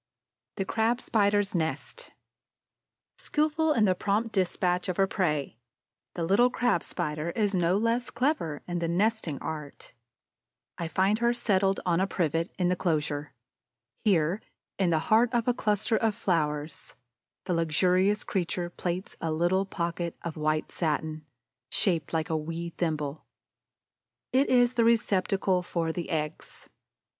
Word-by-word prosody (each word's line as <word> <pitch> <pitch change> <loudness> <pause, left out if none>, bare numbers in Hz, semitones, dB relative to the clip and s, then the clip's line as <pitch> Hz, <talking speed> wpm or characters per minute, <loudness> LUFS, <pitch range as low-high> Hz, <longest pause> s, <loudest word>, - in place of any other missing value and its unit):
THE 195 - -2
CRAB 225 +4 +1
SPIDER'S 205 -3 +1
NEST 175 - -3 1.1
Skillful 310 +1 +1
in 225 -6 +3
the 185 - +4
prompt 210 +4 0
despatch 180 -1 0
of 180 - -2
her 195 - +4
prey, 150 - -1 0.6
the 170 - -2
little 200 +9 +4
Crab 245 -8 +1
spider 155 -2 -3
is 210 -2 +1
no 180 0 +2
less 230 +3 0
clever 240 - -1
in 175 -1 -2
the 170 - -1
nesting 185 -3 0
art. 150 -2 -7 0.9
I 170 - -2
find 190 +6 +2
her 235 0 +3
settled 195 -4 +1
on 175 -1 +2
a 190 - +2
privet 165 -2 0
in 180 -2 +1
the 180 - +3
inclosure. 150 -5 -1 0.7
Here, 180 -1 +2 0.4
in 190 -3 +3
the 165 - +3 0.2
heart 230 +2 +5
of 235 -1 +1
a 245 - +4
cluster 215 -1 +1
of 220 -2 +1
flowers, 155 -7 -2 0.5
the 180 - 0
luxurious 180 +5 +2
creature 175 -2 -2
plaits 180 +1 -4
a 165 - -1
little 175 +5 +1
pocket 170 -2 -3
of 170 -2 -4
white 155 0 -1
satin, 155 -1 -2 0.4
shaped 170 -7 0
like 160 -1 -1
a - - +1
wee 165 +2 -4
thimble. 155 -3 -3 1.1
It 270 +2 +3
is 245 -1 +4
the 235 - +3
receptacle 195 -4 +2
for 170 -2 -2
the 170 0 -5
eggs. 155 -1 -4
180 Hz, 145 wpm, -28 LUFS, 165-210 Hz, 1.1 s, heart